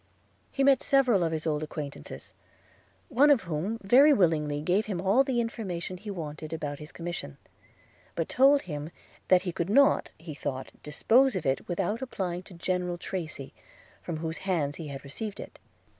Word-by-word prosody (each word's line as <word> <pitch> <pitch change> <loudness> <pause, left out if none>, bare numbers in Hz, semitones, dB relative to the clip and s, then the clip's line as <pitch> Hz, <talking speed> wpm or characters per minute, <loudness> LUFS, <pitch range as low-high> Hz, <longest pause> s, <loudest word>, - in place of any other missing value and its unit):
He 275 - 0
met 275 -1 +5
several 255 -9 +3
of 165 - 0
his 160 -1 -3
old 150 -2 0
acquaintances; 150 -2 -7 0.7
one 285 +5 +4
of 280 -6 +5
whom 175 +6 -2
very 265 +9 +7
willingly 155 - +2
gave 190 +7 +1
him 195 -5 -2
all 195 +9 +4
the 260 -3 0
information 190 -6 -3
he 210 +3 -9
wanted 155 -4 -6
about 145 -3 -4
his 150 0 -10
commission; 165 - -6 0.8
but 165 - -1
told 275 +2 +4
him 150 -3 -5 0.4
that 185 -1 +5
he 180 - -2
could 170 +1 -3
not, 275 +6 +4
he 160 -1 -8
thought, 135 -2 -5
dispose 235 - +3
of 185 - -3
it 135 0 0
without 195 +6 -1
applying 185 -9 -3
to 185 -1 -14
General 180 0 -2
Tracy, 165 -6 -5 0.5
from 170 - -4
whose 160 +1 -4
hands 165 -7 -1
he 160 - -6
had 140 -1 -7
received 200 +9 -6
it. - - -10
175 Hz, 175 wpm, -28 LUFS, 155-220 Hz, 0.8 s, very